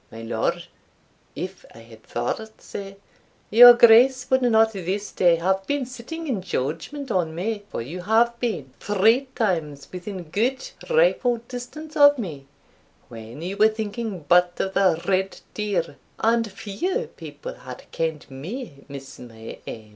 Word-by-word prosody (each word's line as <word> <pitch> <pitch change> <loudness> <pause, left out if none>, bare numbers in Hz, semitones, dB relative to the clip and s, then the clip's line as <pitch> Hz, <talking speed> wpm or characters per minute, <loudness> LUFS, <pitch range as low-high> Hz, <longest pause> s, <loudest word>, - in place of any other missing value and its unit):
My 115 0 -9
Lord, 115 -1 -2 0.7
if - - -6
I 115 - -12
had 115 -1 -15
thought 220 - -4
sae, 195 0 -8 0.6
your 240 +2 +10
Grace 250 +3 +6
would 260 0 +4
not 225 -2 +4
this 195 +2 -3
day 175 -2 +4
have 190 +3 -1
been 285 -2 -1
sitting 255 +7 -7
in 245 -10 -2
judgment 230 - -4
on 165 -5 0
me; 205 +4 -3
for - - -4
you 170 +9 -7
have 230 +4 +2
been 155 - -3
three 220 +7 +3
times 160 - -1
within 185 0 -6
good 235 +11 -1 0.2
rifle 475 - +3
distance 300 +6 -8
of 285 -1 +7
me 155 - -6 0.6
when 115 +5 -9
you 190 +3 -4
were 215 +1 +6
thinking 215 -4 -4
but 175 +1 +4
of 190 - -1
the 185 -5 +3
red 190 0 0
deer, 190 -8 -2 0.2
and 230 -1 +1
few 360 - -3
people - - -8
have - - -11
ken'd 160 -2 -2
me 150 - -7
miss 140 -1 -10
my 115 -2 -10
aim. 110 -1 -8
200 Hz, 150 wpm, -24 LUFS, 165-240 Hz, 0.7 s, your